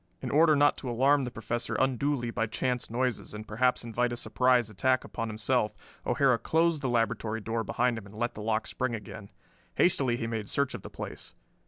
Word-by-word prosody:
In 125 - -4
order 155 +1 +5
not 145 0 +4
to 130 - -5
alarm 135 +3 +3
the - - -3
Professor 115 +1 -3
unduly 130 -1 0
by 115 +1 -1
chance 125 +2 -2
noises 125 -2 -2
and 110 +1 -8
perhaps 125 +4 +1
invite 120 +1 0
a 120 - -3
surprise 125 -1 +2
attack 130 +5 +1
upon 115 -1 -4
himself, 110 +1 0 0.3
O'Hara 130 -2 +3
closed 165 -1 +2
the 130 - -1
laboratory 115 -1 0
door 115 +1 -2
behind 120 +2 0
him 100 - -13
and 100 - -14
let 120 +2 -1
the 105 - -8
lock 110 +1 0
spring 130 -2 -2
again. 105 -1 -9 0.5
Hastily 135 -9 +3
he 115 - -3
made 110 -2 -3
search 140 -1 0
of - - -6
the - - -9
place. - - -8
120 Hz, 200 wpm, -29 LUFS, 110-130 Hz, 0.5 s, order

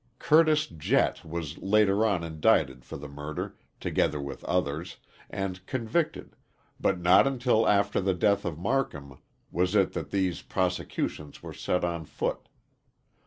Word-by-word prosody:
Curtis 155 0 +4
Jett 80 -3 0
was 80 -2 -5
later 105 +1 +3
on 95 -5 0
indicted 75 -5 +1
for - - -8
the 75 - -8
murder, 75 +2 -6 0.2
together 75 - 0
with 70 -1 -6
others, 85 -1 -1 0.3
and 95 -2 -4
convicted, 130 +6 -2 0.4
but 95 -2 +1
not 90 +8 +6
until 125 -4 +2
after 100 0 +3
the 95 -1 +1
death 100 +3 +2
of 85 -4 -3
Marcum 85 - -2 0.3
was 90 +4 +1
it 100 -3 +3
that - - -4
these 95 -3 0
prosecutions 90 -5 -3
were - - -7
set 90 - -1
on 85 -2 -3
foot. - - -3
90 Hz, 140 wpm, -28 LUFS, 80-105 Hz, 0.4 s, not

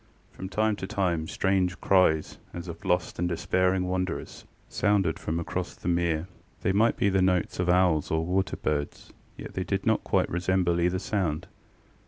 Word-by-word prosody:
From 95 - -7
time 110 +1 +1
to 95 - -5
time 90 -6 -1
strange 95 -1 0
cries 90 -5 +2 0.2
as 85 +1 -6
of 85 -1 -8
lost 90 -1 0
and 90 0 0
despairing 90 +2 +1
wanderers 90 0 -3 0.2
sounded 100 -6 +1
from 80 +1 -2
across 90 +2 -4
the - - -8
mere. 85 -1 +1 0.4
They - - +2
might 110 +4 +3
be 100 - +2
the 95 -1 +2
notes 90 -2 +1
of 90 -1 +1
owls 90 -4 +3
or 80 0 0
water 95 +2 0
birds, 75 -1 -3 0.2
yet - - -8
they - - -2
did - - -2
not - - +2
quite - - +1
resemble 90 0 +1
either 90 +2 +2
sound. 90 -5 -1
90 Hz, 175 wpm, -27 LUFS, 85-95 Hz, 0.4 s, might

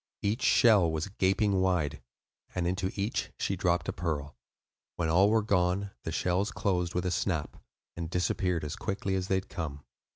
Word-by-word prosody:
Each 105 +5 0
shell 105 -8 +5
was 80 +4 -2
gaping 95 0 +2
wide, 90 -6 0 0.5
and 90 -1 0
into 95 +1 0
each 100 +3 -2
she 95 - -1
dropped 90 -1 +1
a - - -1
pearl. 75 -4 -3 0.6
When 80 -2 -1
all 95 +5 +5
were 110 0 +3
gone, 100 0 +1
the 80 - -2
shells 90 +5 0
closed 90 -4 -1
with 90 0 0
a 90 - 0
snap, 85 -4 -1 0.4
and 85 -1 -4
disappeared 90 -1 0
as 75 - -4
quickly 100 -1 -2
as 95 -1 -1
they 95 - +2
had 95 - -2
come. 75 -6 -5
90 Hz, 175 wpm, -30 LUFS, 85-100 Hz, 0.6 s, shell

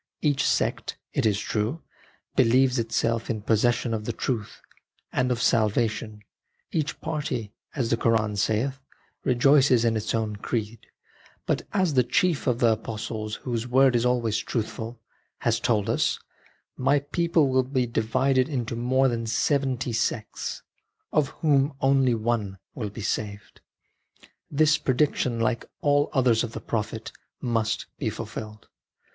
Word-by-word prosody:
Each 145 -3 +2
sect, - - 0 0.2
it - - +2
is 105 -1 +1
true, 110 +8 -2 0.5
believes 130 +1 +4
itself 115 0 0
in 110 -3 -2
possession 115 +2 +2
of 105 -1 -3
the 120 - -1
truth 110 -3 -3 0.5
and 125 0 +1
of 120 - 0
salvation, 110 -2 +1 0.2
" - - -47
each 155 -2 -2
party," 140 -9 -3 0.2
as 125 -5 -1
the 115 - +3
Koran 110 -2 +1
saith, 110 +6 0 0.2
" - - -40
rejoices 130 -1 +4
in 115 -1 +2
its 110 +1 -1
own 110 -2 -2
creed 110 +1 -4 0.3
"; - - -29
but - - -1
as 185 -6 +1
the 130 - +5
chief 150 +6 +1
of 125 -2 +2
the 120 -1 +4
apostles, 110 -1 -4
whose 120 -2 -2
word 130 +1 +4
is 120 - +2
always 120 -4 +1
truthful, 115 +1 -4 0.4
has 115 -1 +1
told 110 -4 +1
us, - - +1 0.3
" - - -35
My 140 +2 +2
people 160 0 +1
will 130 0 +3
be 130 -1 0
divided 130 +4 +1
into 120 -5 -2
more 130 +3 +2
than 115 -2 -2
seventy 130 +1 0
sects, 110 -1 -2 0.5
of 150 -2 +3 0.2
whom 140 -1 +3
only 135 -3 +3
one 110 -3 -1 0.2
will 105 -5 -4
be 110 +3 -8
saved." 100 -1 -4 0.9
This 155 +2 +3
prediction, 130 -3 +1
like 115 +1 -1
all 145 0 +3
others 125 -4 +3
of 115 -1 -5
the - - -4
Prophet, 110 0 -3 0.3
must 110 -3 -1
be 125 - 0
fulfilled. 110 0 -7
120 Hz, 150 wpm, -26 LUFS, 110-135 Hz, 0.9 s, the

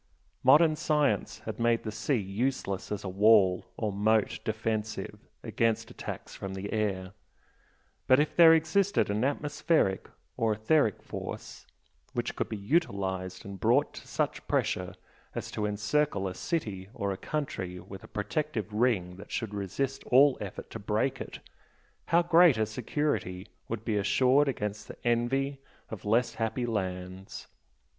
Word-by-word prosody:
Modern 155 +4 +6
science 150 - 0
had - - -5
made 115 0 +2
the 110 - -4
sea 110 +6 0
useless 100 0 -2
as 105 - -3
a - - -4
"wall" 95 -1 +4
or 105 -3 -1
"moat 110 +2 +2
defensive" 110 -1 -3 0.2
against 115 -1 0
attacks - - -7
from 95 -1 -6
the 100 +3 -5
air, 95 -4 -1 1.0
but 130 0 +6
if 150 - +1
there 165 -2 +9
existed 165 - +2
an 105 +3 0
atmospheric 145 - +1 0.3
or 115 -1 +2
"etheric" 110 +1 +2
force - - -7 0.5
which - - -2
could - - -2
be 110 - -3
utilised 100 - -1
and 100 -1 -8
brought 125 +6 +3
to - - -11
such - - -2
pressure 90 0 0 0.4
as - - -4
to 105 - -1
encircle 105 +1 0
a 95 - -4
city 100 - -3
or 100 0 -1
a - - -2
country 95 -9 -4
with 95 +1 -10
a - - -11
protective 110 0 -3
ring 105 -6 +1
that 100 - -12
should 110 -3 -3
resist 115 +7 -3
all 135 +1 +6
effort 100 -2 -7
to 115 - -6
break 110 +6 -1
it, - - -7 0.7
how 170 +2 +4
great 170 -5 +6
a 110 - +2
security 110 -5 -2 0.2
would 115 -1 -5
be 110 -3 0
assured 130 +7 +3
"against 105 -5 -3
the - - -9
envy 135 +4 +1 0.3
of 110 -3 -7
less 115 +4 +2
happy 115 +2 -1
lands"! 95 -3 -4
110 Hz, 150 wpm, -29 LUFS, 100-135 Hz, 1.0 s, there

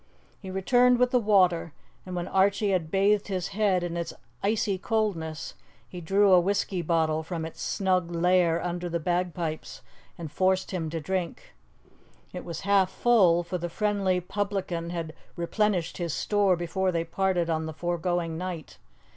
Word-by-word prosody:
He 190 - -9
returned 245 +6 +3
with 250 0 +2
the 250 - +4
water, 185 -7 +3 0.3
and 180 - -5
when 175 0 -3
Archie 195 +1 +2
had 175 -4 0
bathed 200 +3 +2
his 190 -2 -2
head 195 -4 +1
in 175 -1 -3
its 170 -1 -3 0.3
icy 200 -2 0
coldness, 185 -8 -2 0.3
he 180 - -8
drew 195 +4 +3
a 180 - +8
whisky 190 0 0
bottle 160 -1 +1
from 160 0 -4
its 160 - -9
snug 185 -3 0
lair 175 -1 +2
under 175 0 -3
the 170 0 -1
bagpipes, 175 -3 -3 0.3
and 160 -4 -7
forced 185 +4 +1
him 170 -4 -2
to 165 +1 -3
drink. 180 +1 -4 0.8
It - - -6
was 170 -1 -6
half 195 -2 +3
full, 190 -7 +4
for 180 +1 -4
the 175 +1 -3
friendly 200 -1 0
publican 185 -3 -3
had 165 -2 -4 0.2
replenished 180 0 0
his 170 -3 -2
store 205 -3 +2
before 180 +2 -1
they 165 -1 0
parted 180 0 0
on 160 0 -1
the - - -4
foregoing 175 0 -2
night. 180 -4 -6
180 Hz, 165 wpm, -27 LUFS, 170-195 Hz, 0.8 s, a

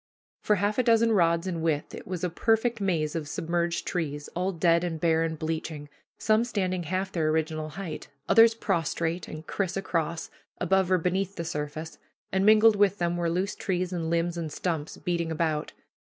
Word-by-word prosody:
For 210 - +3
half 205 +4 0
a - - +4
dozen 230 -1 +4
rods 170 -4 +3
in 175 -3 -3
width 155 -2 -1
it - - -9
was 185 -2 -4
a 180 - +1
perfect 225 +4 +1
maze 165 -6 0
of 160 -3 -3
submerged 170 +3 -1
trees, 150 -5 -3
all 180 +2 0
dead 170 -1 +3
and 165 -3 -3
bare 160 0 +2
and 160 -1 -2
bleaching, 155 -2 -4 0.3
some 215 +1 +3
standing 185 -6 -1
half 185 +4 -2
their 160 -4 0
original 155 0 -1
height, 160 0 -6 0.2
others 225 0 +6
prostrate, 170 -4 -1
and 155 +1 -8
criss 195 -1 -2
across, 170 -3 -2 0.3
above 190 +1 +2
or 185 - +5
beneath 185 +3 -1
the 170 - -4
surface, 155 +1 -5 0.3
and 190 +1 +2
mingled 215 0 +7
with 200 0 +3
them 175 -1 0
were 170 -1 0
loose 185 +4 -1
trees 185 -1 -2
and 165 -2 -2
limbs 170 +1 0
and 160 -2 -4
stumps, 160 -2 -3
beating 170 -2 -2
about. 155 -2 -1
170 Hz, 185 wpm, -27 LUFS, 160-190 Hz, 0.3 s, mingled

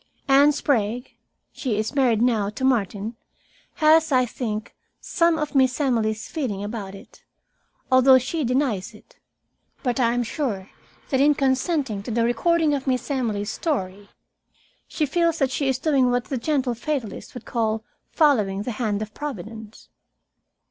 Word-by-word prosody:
Anne 280 +2 +6
Sprague 245 -4 -1 0.4
she 235 -6 -3
is 215 +4 -2
married 245 -5 +2
now 220 -5 +2
to 220 +5 -7
Martin 220 -3 0 0.6
has, 315 -1 +4
I 255 -2 +4
think, 215 -3 -5 0.3
some 335 -1 +1
of 300 -1 -3
Miss 260 -1 +3
Emily's 225 -6 0
feeling 235 -11 -3
about 205 -2 -6
it, - - -16 0.7
although 260 0 +7
she 295 +5 -2
denies 250 -6 -1
it. - - -20 0.7
But 250 -1 -1
I 235 -2 +3
am 245 0 0
sure 220 -6 -3 0.4
that 265 -1 +2
in 295 +1 +5
consenting 265 - 0
to 205 - -8
the 230 0 +1
recording 320 +6 +2
of 275 -1 -3
Miss 255 +2 -1
Emily's 220 -6 -1
story, 200 - -3 0.8
she 310 - -1
feels 335 +2 +1
that 270 -3 +1
she 275 +1 -1
is 265 - +1
doing 270 -3 +2
what 245 0 +1
that 260 -4 -4
gentle 270 -3 0
fatalist 245 -3 -4
would 245 - -8
call 220 -2 -1 0.3
following 210 - +2
the 245 - -3
hand 210 -2 0
of 215 0 -10
Providence. 220 -5 -8
250 Hz, 155 wpm, -23 LUFS, 215-285 Hz, 0.8 s, although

